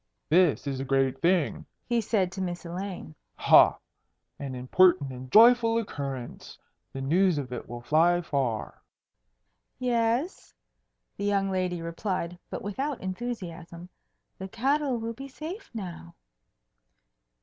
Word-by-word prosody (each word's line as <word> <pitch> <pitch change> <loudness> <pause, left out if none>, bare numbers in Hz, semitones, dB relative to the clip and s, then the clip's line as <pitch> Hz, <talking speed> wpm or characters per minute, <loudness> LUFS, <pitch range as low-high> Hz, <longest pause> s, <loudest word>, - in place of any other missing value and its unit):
"This 170 -3 +3
is 135 -2 -3
a - - -2
great 135 -1 +1
thing!" 175 -2 +1 0.2
he 240 -1 +1
said 195 -4 0
to 190 - -5
Miss 175 -1 -4
Elaine. 180 - -6 0.2
"Ha! - - +6 0.6
an 135 -2 -5
important 145 +3 +3
and 130 0 -9
joyful 230 +2 +6
occurrence. 140 - -5 0.3
The 135 - -6
news 175 +4 +3
of 130 -3 -4
it 120 - -7
will 120 0 -7
fly 165 +6 +3
far." 135 -8 -2 1.0
"Yes," 245 +6 -1 0.6
the 200 - -3
young 195 -1 +1
lady 180 -2 -1
replied, 175 0 -3
but - - -6
without 265 +8 -3
enthusiasm. 180 -5 -6 0.5
"The 190 - -5
cattle 270 +5 0
will 230 0 -4
be 270 +4 -9
safe 320 - -8
now." 175 -6 -8
180 Hz, 125 wpm, -27 LUFS, 145-225 Hz, 1.0 s, Ha